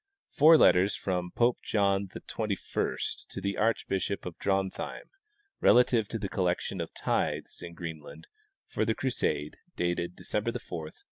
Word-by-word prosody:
Four 160 Hz, +3 st, +7 dB
letters 95 Hz, -6 st, +5 dB
from 90 Hz, -2 st, -2 dB
Pope 120 Hz, +5 st, +2 dB
John 100 Hz, -2 st, +1 dB
XXI -, -, -3 dB
to -, -, -7 dB
the 100 Hz, 0 st, -2 dB
archbishop 100 Hz, -3 st, 0 dB
of 90 Hz, -2 st, -5 dB
Drontheim, 95 Hz, -1 st, -2 dB, 0.5 s
relative 120 Hz, -3 st, +5 dB
to 115 Hz, -, -3 dB
the 105 Hz, -, -3 dB
collection 90 Hz, -1 st, -1 dB
of 85 Hz, -, -5 dB
tithes -, -, -1 dB
in 85 Hz, -1 st, -8 dB
Greenland 80 Hz, -4 st, -8 dB, 0.4 s
for -, -, -1 dB
the 110 Hz, 0 st, +1 dB
Crusade, 120 Hz, -, -1 dB, 0.2 s
dated 85 Hz, 0 st, -1 dB
December 105 Hz, +2 st, -2 dB
4, -, -, -14 dB
1276. 80 Hz, -3 st, -6 dB
95 Hz, 140 wpm, -29 LUFS, 90-110 Hz, 0.5 s, Four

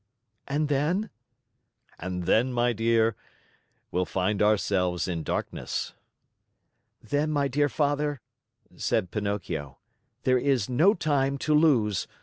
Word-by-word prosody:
"And 150 Hz, +2 st, 0 dB
then?" 155 Hz, +9 st, 0 dB, 0.9 s
"And 90 Hz, 0 st, -4 dB
then, 115 Hz, +9 st, +2 dB
my 120 Hz, 0 st, +1 dB
dear, 115 Hz, 0 st, +2 dB, 0.8 s
we'll 90 Hz, +1 st, 0 dB
find 95 Hz, +2 st, -1 dB
ourselves 95 Hz, -4 st, +1 dB
in 85 Hz, -3 st, -2 dB
darkness." -, -, -3 dB, 1.1 s
"Then, 145 Hz, +7 st, 0 dB
my 145 Hz, -2 st, +1 dB
dear 145 Hz, +2 st, +1 dB
Father," 145 Hz, -1 st, 0 dB, 0.6 s
said 95 Hz, -6 st, -1 dB
Pinocchio, 95 Hz, -9 st, -3 dB, 0.5 s
"there 130 Hz, -1 st, +3 dB
is 130 Hz, -6 st, +1 dB
no 165 Hz, -, +4 dB
time 140 Hz, -4 st, 0 dB
to 155 Hz, -, +2 dB
lose. 120 Hz, -, +3 dB
120 Hz, 115 wpm, -27 LUFS, 100-145 Hz, 1.1 s, no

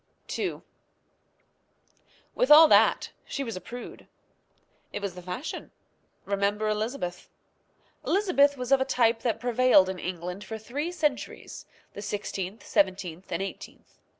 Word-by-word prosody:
II. -, -, -3 dB, 1.7 s
With -, -, +1 dB
all 315 Hz, +2 st, +10 dB
that -, -, +4 dB
she 275 Hz, -, -4 dB
was 230 Hz, -5 st, -5 dB
a 185 Hz, -, -6 dB
prude. 245 Hz, 0 st, -9 dB, 0.8 s
It -, -, -4 dB
was 200 Hz, -3 st, -4 dB
the 180 Hz, -, -9 dB
fashion. 180 Hz, -, -6 dB, 0.6 s
Remember 200 Hz, +2 st, 0 dB
Elizabeth. 215 Hz, -4 st, -3 dB, 0.7 s
Elizabeth 335 Hz, -8 st, +3 dB
was 250 Hz, +1 st, -5 dB
of 270 Hz, -1 st, +5 dB
a -, -, +5 dB
type 240 Hz, -4 st, +2 dB
that 225 Hz, -2 st, -1 dB
prevailed 245 Hz, -5 st, +4 dB
in 190 Hz, -1 st, -4 dB
England 180 Hz, +2 st, -5 dB
for 220 Hz, -, -6 dB
three 285 Hz, +10 st, -4 dB
centuries 300 Hz, -6 st, -3 dB, 0.3 s
the 205 Hz, -, -7 dB
sixteenth, 200 Hz, 0 st, -5 dB
seventeenth, 185 Hz, -2 st, -1 dB
and -, -, -1 dB
eighteenth. 195 Hz, -, -10 dB
220 Hz, 130 wpm, -27 LUFS, 190-265 Hz, 1.7 s, all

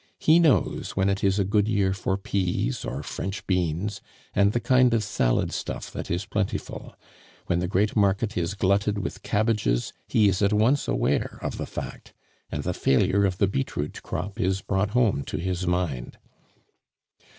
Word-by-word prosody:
He 160 Hz, +2 st, +5 dB
knows 160 Hz, -6 st, +2 dB
when 95 Hz, 0 st, +2 dB
it 100 Hz, 0 st, -1 dB
is 95 Hz, 0 st, +3 dB
a 100 Hz, -, +3 dB
good 105 Hz, +1 st, +2 dB
year 100 Hz, -3 st, +2 dB
for 95 Hz, 0 st, -1 dB
peas 90 Hz, -10 st, -1 dB
or 70 Hz, +3 st, -4 dB
French 95 Hz, +7 st, -5 dB
beans, 90 Hz, +2 st, -1 dB, 0.3 s
and 100 Hz, +1 st, +4 dB
the 120 Hz, -, 0 dB
kind 125 Hz, -1 st, +4 dB
of 110 Hz, -, +1 dB
salad -, -, +1 dB
stuff -, -, -5 dB
that -, -, -6 dB
is 90 Hz, +3 st, -1 dB
plentiful; 100 Hz, 0 st, -3 dB, 0.5 s
when 85 Hz, -, +1 dB
the 90 Hz, -, -1 dB
Great 100 Hz, +3 st, +1 dB
Market 100 Hz, +1 st, +2 dB
is 90 Hz, +3 st, -1 dB
glutted 100 Hz, +1 st, +1 dB
with 100 Hz, -, -4 dB
cabbages, 105 Hz, -, 0 dB
he 110 Hz, -2 st, +4 dB
is 95 Hz, 0 st, +1 dB
at 100 Hz, +1 st, +3 dB
once 115 Hz, +7 st, +3 dB
aware -, -, 0 dB
of -, -, -3 dB
the -, -, -3 dB
fact, -, -, -8 dB, 0.4 s
and -, -, -3 dB
the -, -, -1 dB
failure 100 Hz, +9 st, +2 dB
of 90 Hz, -2 st, -1 dB
the 100 Hz, -, +3 dB
beetroot 80 Hz, -9 st, -3 dB
crop 100 Hz, +4 st, -5 dB
is 95 Hz, +1 st, +1 dB
brought 95 Hz, +1 st, 0 dB
home 105 Hz, -, +2 dB
to -, -, -4 dB
his 90 Hz, +2 st, -2 dB
mind. 85 Hz, -9 st, -2 dB
100 Hz, 175 wpm, -25 LUFS, 90-105 Hz, 0.5 s, He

